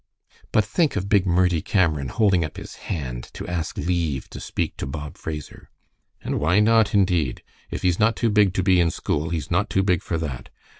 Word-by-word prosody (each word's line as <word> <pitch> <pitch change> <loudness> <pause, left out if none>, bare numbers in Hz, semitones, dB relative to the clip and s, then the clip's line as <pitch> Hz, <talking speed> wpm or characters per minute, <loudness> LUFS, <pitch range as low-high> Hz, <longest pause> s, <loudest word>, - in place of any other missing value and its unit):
"But 110 - +3
think 145 +9 +1
of 100 - -2
big 100 -2 +3
Murdie 90 -2 +2
Cameron 80 -8 +1
holding 100 - +2
up 75 - -6
his - - -8 0.2
hand 65 -7 -4
to - - -7
ask 85 -2 -3
leave 85 -6 -1
to - - -7
speak - - -3
to - - -4
Bob 75 +1 -6
Fraser!" 75 -2 -7 0.5
"And - - -2
why 90 +7 +3
not 110 -1 +4
indeed? 90 -10 +1 0.3
If - - -5
he's 90 -2 +2
not 110 +1 +3
too 115 0 +1
big 105 -3 +3
to 95 - +1
be 90 -1 +4
in 85 -1 +3
school 75 0 -2
he's 80 -2 -4
not 100 +4 +1
too 95 - +1
big 90 -3 +2
for 85 - -2
that. 75 -6 -5
90 Hz, 205 wpm, -23 LUFS, 80-100 Hz, 0.5 s, not